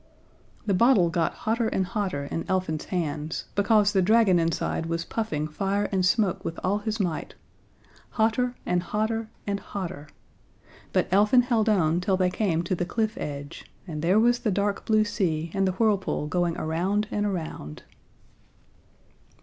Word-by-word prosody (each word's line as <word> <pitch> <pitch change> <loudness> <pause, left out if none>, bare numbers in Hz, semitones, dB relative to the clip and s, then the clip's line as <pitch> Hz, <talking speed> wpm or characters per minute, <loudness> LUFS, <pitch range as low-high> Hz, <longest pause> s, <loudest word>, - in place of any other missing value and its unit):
The 200 - +1
bottle 190 -4 +4
got 165 -1 +1
hotter 225 +1 +1
and 190 -3 0
hotter 185 -8 -2
in 165 +3 -5
Elfin's 185 -5 -1
hands, 160 -3 -3
because 210 0 +3
the 190 - +3
dragon 205 -2 +4
inside 165 0 -1
was 165 0 -2
puffing 155 -10 -2
fire 195 +6 -1
and 190 -2 +1
smoke 190 0 +2
with 165 - -4
all 200 +3 +1
his 220 +1 -3
might 175 -5 -2 0.8
hotter 240 +3 +2
and 180 0 +1
hotter 220 +4 -2 0.2
and 200 -1 -1
hotter 170 -9 -6 0.8
but - - +1
Elfin 210 +6 +5
held 230 -3 +1
on 175 -4 +2
till 190 +1 +1
they 185 -1 +2
came 180 -5 0
to 175 - -2
the 175 - -1
cliff 220 +4 -1
edge, 145 +1 -7
and 155 -5 -5
there 180 +6 +3
was 240 +1 +3
the 220 - -1
dark 200 +1 -1
blue 215 -1 +4
sea, 165 -6 -1
and 195 -1 +1
the 185 - 0
whirlpool 200 -6 +1
going 175 +1 0
around 185 +7 0
and 205 0 0
around. 160 - -5
190 Hz, 160 wpm, -26 LUFS, 165-215 Hz, 0.8 s, Elfin